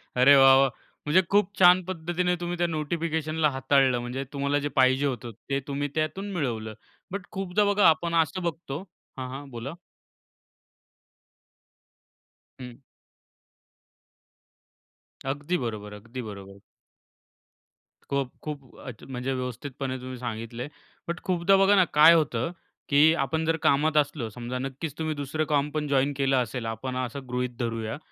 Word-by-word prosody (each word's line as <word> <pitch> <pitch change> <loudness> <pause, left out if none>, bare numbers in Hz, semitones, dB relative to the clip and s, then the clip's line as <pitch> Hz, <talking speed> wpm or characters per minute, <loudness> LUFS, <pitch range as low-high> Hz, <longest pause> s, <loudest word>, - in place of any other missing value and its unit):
अरे 130 +3 +7
वाह, 135 -1 +8
वाह! 135 0 +4 0.4
म्हणजे 180 +5 +5
खूप 205 -1 +3
छान 180 0 +7
पद्धतीने 180 0 -1
तुम्ही 175 0 -3
त्या 175 0 +1
नोटिफिकेशनला 160 -1 -1
हाताळलं. 135 -2 +2
म्हणजे 125 +3 -4
तुम्हाला 140 +1 0
जे - - 0
पाहिजे 130 +2 +4
होतं 125 -3 -3 0.2
ते 135 - +1
तुम्ही 145 0 -2
त्यातून 160 +6 -2
मिळवलं. 115 - -3 0.4
बट 200 -1 -5
खूपदा 195 +1 0
बघा 205 -1 +5
आपण 170 +1 0
असं 165 +4 -3
बघतो 160 -4 -4 0.4
हां, 130 -1 -5
हां. 135 +2 -8
बोला. 120 +5 -6 2.9
हं. 125 0 -10 2.5
अगदी 145 +6 -1
बरोबर. 110 -5 -5
अगदी 115 +5 -8
बरोबर. 100 -3 -10 1.5
खूप, 140 -2 -1
खूप. 145 -4 -7
अ, 130 - -5 0.2
म्हणजे 130 +1 -3
व्यवस्थितपणे 130 +1 -4
तुम्ही 130 0 -7
सांगितलं 115 -1 -5
आहे. 145 - -7 0.4
बट 170 +1 -4
खूपदा 185 +1 +3
बघा 195 +1 +5
ना 190 - +6
काय 155 +3 +8
होतं, 150 -3 +1 0.4
की 150 +3 +6
आपण 160 +1 -1
जर 165 0 +2
कामात 155 +2 +3
असलो 145 -5 0
समजा 120 +3 -5
नक्कीच 135 +3 -5
तुम्ही 155 -1 -1
दुसरं 145 +2 -2
काम 145 -1 +2
पण 150 -1 -2
जॉइन 140 0 +2
केलं 135 -1 +2
असेल 120 +1 -5
आपण 115 +3 -4
असं 130 +2 -3
गृहीत 125 0 -1
धरूया. 115 0 -3
140 Hz, 140 wpm, -26 LUFS, 125-160 Hz, 2.9 s, वाह